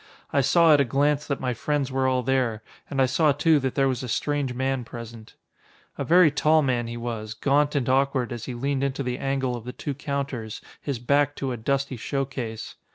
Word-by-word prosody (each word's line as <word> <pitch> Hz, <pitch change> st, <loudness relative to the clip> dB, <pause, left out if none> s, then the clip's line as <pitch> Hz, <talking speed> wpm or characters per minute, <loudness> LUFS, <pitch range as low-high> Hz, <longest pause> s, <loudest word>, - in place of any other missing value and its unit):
I 140 Hz, -, +4 dB
saw 165 Hz, +4 st, +5 dB
at 145 Hz, -, +5 dB
a -, -, +5 dB
glance 145 Hz, +3 st, +1 dB
that 140 Hz, -, -2 dB
my 125 Hz, -1 st, -1 dB
friends 140 Hz, +2 st, -1 dB
were 130 Hz, 0 st, +1 dB
all 130 Hz, -1 st, +1 dB
there, 125 Hz, -4 st, 0 dB, 0.3 s
and 140 Hz, -, -3 dB
I 135 Hz, -, +5 dB
saw 150 Hz, +4 st, +3 dB
too 155 Hz, +2 st, +3 dB
that 130 Hz, -2 st, -2 dB
there 135 Hz, -1 st, +3 dB
was 130 Hz, -3 st, -1 dB
a 130 Hz, -, -5 dB
strange 145 Hz, +3 st, -1 dB
man 130 Hz, +1 st, -1 dB
present. 115 Hz, -1 st, -10 dB, 0.6 s
A -, -, -3 dB
very 165 Hz, +3 st, +5 dB
tall 155 Hz, +2 st, +3 dB
man 120 Hz, -3 st, 0 dB
he 120 Hz, 0 st, -5 dB
was, 115 Hz, -2 st, -5 dB
gaunt 145 Hz, +4 st, +2 dB
and 135 Hz, -4 st, 0 dB
awkward 135 Hz, -1 st, +1 dB
as 120 Hz, -, -6 dB
he 125 Hz, -, -5 dB
leaned 135 Hz, +2 st, -1 dB
into 140 Hz, 0 st, -1 dB
the 125 Hz, 0 st, -3 dB
angle 135 Hz, -2 st, -1 dB
of 120 Hz, -, -7 dB
the 125 Hz, +1 st, -7 dB
two 145 Hz, -, -4 dB
counters, 135 Hz, -5 st, -4 dB, 0.2 s
his 140 Hz, -4 st, -3 dB
back 140 Hz, +4 st, +1 dB
to 135 Hz, -2 st, -3 dB
a -, -, -2 dB
dusty 135 Hz, +3 st, -1 dB
show 135 Hz, +4 st, -2 dB
case. 120 Hz, -5 st, -6 dB
135 Hz, 225 wpm, -25 LUFS, 125-140 Hz, 0.6 s, saw